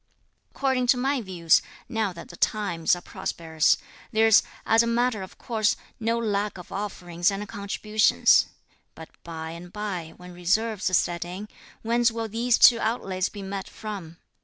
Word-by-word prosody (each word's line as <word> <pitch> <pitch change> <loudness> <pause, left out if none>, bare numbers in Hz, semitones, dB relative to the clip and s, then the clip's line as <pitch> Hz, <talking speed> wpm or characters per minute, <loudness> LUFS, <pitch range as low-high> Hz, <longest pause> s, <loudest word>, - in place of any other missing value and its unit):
According 265 -2 0
to 250 - +5
my 265 +1 0
views, 175 -5 +3 0.3
now 225 -5 -1
that 170 -1 -11
the 175 - -10
times 175 -5 +1
are 175 - -8
prosperous, 160 -2 0 0.3
there's, 220 -1 +6 0.2
as 225 +1 +5
a 235 - 0
matter 235 -2 +1
of 190 - -10
course, 220 -3 0 0.2
no 230 +1 0
lack 210 -3 -1
of 180 - -11
offerings 175 -3 -1
and 200 +1 -4
contributions; 210 +1 +3 0.5
but 160 - -10
by 160 -1 -6
and 170 +1 -10
bye, 185 -6 -5
when 180 0 -11
reverses 185 +1 +1
set 170 -1 -1
in, 185 +4 -7 0.3
whence 235 +1 +3
will 225 0 -3
these 230 +2 +1
two 235 -2 +7
outlays 195 -5 -1
be 205 -2 -8
met 195 0 -5
from? 190 -7 -7
205 Hz, 160 wpm, -26 LUFS, 175-225 Hz, 0.5 s, two